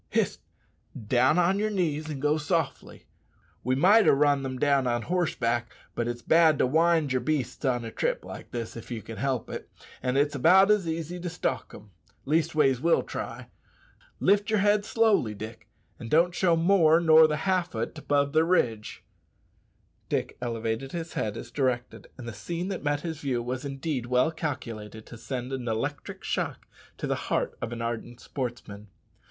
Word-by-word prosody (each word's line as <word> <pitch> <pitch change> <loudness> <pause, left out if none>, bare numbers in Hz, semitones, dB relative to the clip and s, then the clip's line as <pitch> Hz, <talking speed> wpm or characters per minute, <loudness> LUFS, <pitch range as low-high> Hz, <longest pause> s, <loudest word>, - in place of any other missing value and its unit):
Hist! - - 0 0.7
down 130 +7 +3
on 180 +3 +3
yer 215 +1 +1
knees 160 -6 -1
and 145 -3 -4
go 150 +2 +1
softly. 150 - -2 0.6
We 130 +2 +1
might 200 +10 +5
ha' - - +6
run 145 0 +3
them 130 -1 -4
down 140 -1 +2
on 120 -1 0
horseback, 120 -10 -1 0.2
but 120 - -2
it's 120 0 -4
bad 160 -2 +5
to - - +3
wind 160 0 +2
yer 130 - +2
beasts 135 -3 -2
on 120 -3 0
a 115 - -6
trip - - -2
like - - -9
this, 115 -2 -5
if 115 - -9
ye 115 -3 -4
can 115 0 -9
help 135 -3 -1
it; - - -7 0.3
an' 125 +1 0
it's 145 +1 +2
about 185 +9 +5
as 205 -5 +2
easy 165 +2 -3
to 175 0 -4
stalk 150 -8 -3
them. 105 -1 -13 0.3
Leastways, 150 -3 +2
we'll 170 +2 +3
try. - - -6 0.7
Lift 205 +2 +3
yer 215 - +2
head 205 +1 +3
slowly, 215 - +2
Dick, 110 +1 -9 0.3
an' 115 - -7
don't 170 +5 +3
show 175 -2 +3
more 165 -2 +4
nor 160 -1 +7
the 150 -1 -1
half 185 -6 0
o't 110 +1 -3
above 140 0 0
the 160 +1 +4
ridge." 120 -11 0 1.1
Dick - - -1
elevated 115 +2 -3
his 170 -1 -5
head 105 -2 -2
as - - -8
directed, 130 -3 -2
and 125 -2 -8
the 120 - -5
scene 170 - -4
that 195 - -4
met 145 -1 0
his 160 -3 -5
view 125 -4 -1
was 125 +3 -4
indeed 135 -2 -3
well 125 +5 +2
calculated 115 -9 -5
to - - -11
send 125 +2 -5
an 125 -2 -4
electric 135 +6 -3
shock - - -3 0.3
to - - -4
the - - 0 0.2
heart - - 0
of - - -4
an 115 -1 -4
ardent 120 +1 -4
sportsman. 120 -7 -6
140 Hz, 180 wpm, -27 LUFS, 120-165 Hz, 1.1 s, nor